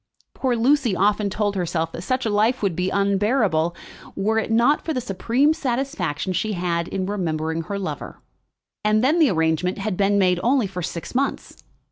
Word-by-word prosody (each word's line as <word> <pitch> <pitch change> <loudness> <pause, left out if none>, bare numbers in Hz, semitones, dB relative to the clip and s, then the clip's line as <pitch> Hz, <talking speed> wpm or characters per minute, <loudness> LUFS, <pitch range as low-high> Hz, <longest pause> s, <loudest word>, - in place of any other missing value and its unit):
Poor 255 -2 0
Lucy 245 -2 +2
often 205 +2 +2
told 205 0 -1
herself 170 -3 -1
that - - -7
such 255 +7 -1
a - - +1
life 215 +4 +1
would 190 -5 +1
be 180 +2 0
unbearable, 200 -4 +1 0.4
were 220 +3 +1
it 220 - -3
not 235 +6 +3
for 320 - -2
the - - +1
supreme 245 +7 +1
satisfaction 240 - -2
she 215 +4 -1
had 170 -2 -1
in 190 -1 -3
remembering 165 -5 -2
her 200 +5 -5
lover. 195 -1 -6 0.6
And 215 +1 +2
then 305 +6 +3
the 315 - +5
arrangement 160 0 0
had 200 -1 -2
been 200 +1 +2
made 180 -2 +3
only 250 -1 +2
for 185 -2 -5
six 170 0 -5
months. 275 +2 -2
200 Hz, 180 wpm, -22 LUFS, 180-240 Hz, 0.6 s, the